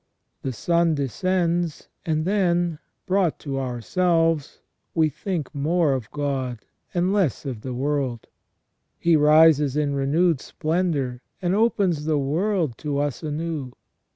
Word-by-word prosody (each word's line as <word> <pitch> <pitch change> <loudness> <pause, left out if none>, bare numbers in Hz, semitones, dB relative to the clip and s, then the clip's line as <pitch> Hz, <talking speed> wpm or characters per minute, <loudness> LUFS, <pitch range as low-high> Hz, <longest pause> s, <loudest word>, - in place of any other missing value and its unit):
The 135 - -3
sun 170 +6 +1
descends, 170 +4 -1 0.2
and 155 -1 0
then, 175 -4 +1 0.3
brought 185 -4 +1
to 135 -2 -3
ourselves, 165 - 0 0.3
we 160 -2 +3
think 160 0 -4
more 155 +1 +2
of 125 -4 -4
God 135 -5 -3 0.3
and 180 +2 +1
less 180 - +1
of 125 -6 -5
the 130 0 -5
world; 135 -3 -1 0.7
he 170 -1 +3
rises 150 -2 +5
in 145 -2 +1
renewed 145 +3 +2
splendour 155 -7 -1 0.2
and 180 -1 0
opens 195 -8 +1
the 155 -1 +1
world 155 - 0
to 145 -2 -2
us 145 -2 -1
anew. 155 -4 -4
155 Hz, 125 wpm, -24 LUFS, 140-175 Hz, 0.7 s, rises